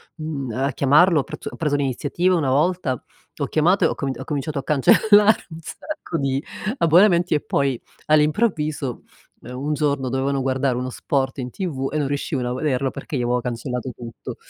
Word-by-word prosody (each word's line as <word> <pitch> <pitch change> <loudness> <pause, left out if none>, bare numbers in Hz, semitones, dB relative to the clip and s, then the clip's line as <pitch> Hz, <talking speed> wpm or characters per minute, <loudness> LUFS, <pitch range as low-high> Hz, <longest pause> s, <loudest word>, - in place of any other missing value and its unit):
mhmm, 150 -6 -4
a 135 +5 -1
chiamarlo, 150 +6 +4
ho 135 - 0
prezzo - - -7
ho - - -9
preso 150 -3 0
l'iniziativa 145 +6 0
una 145 -6 0
volta, 150 -2 +1 0.4
ho - - -1
chiamato, 175 +5 +2
e - - +6
ho - - -2
comin 135 -2 -3
ho - - -5
cominciato 145 0 -3
a - - -6
cancellare 205 +9 +4
un 160 - -9
sacco 175 - -6
di 135 0 -1 0.3
abbonamenti 175 - +4
e 150 - 0
poi 135 -4 0 0.3
all'improvviso, 155 - +1 0.4
ehm, 125 +1 -8
un 145 +3 -2
giorno 140 -3 0
dovevano 135 +2 0
guardare 130 -1 0
uno 125 +1 -3
sport 135 +1 -2
in 125 -1 -4
TV 135 -5 -3
e 155 - -1
non 145 -2 0
riuscivano 140 -2 -2
a - - -2
vederlo 135 -1 -1
perché 145 - -5
gli - - -1
avevo 125 +1 0
cancellato 125 +1 -4
tutto. 115 -1 -8
140 Hz, 185 wpm, -22 LUFS, 130-160 Hz, 0.4 s, e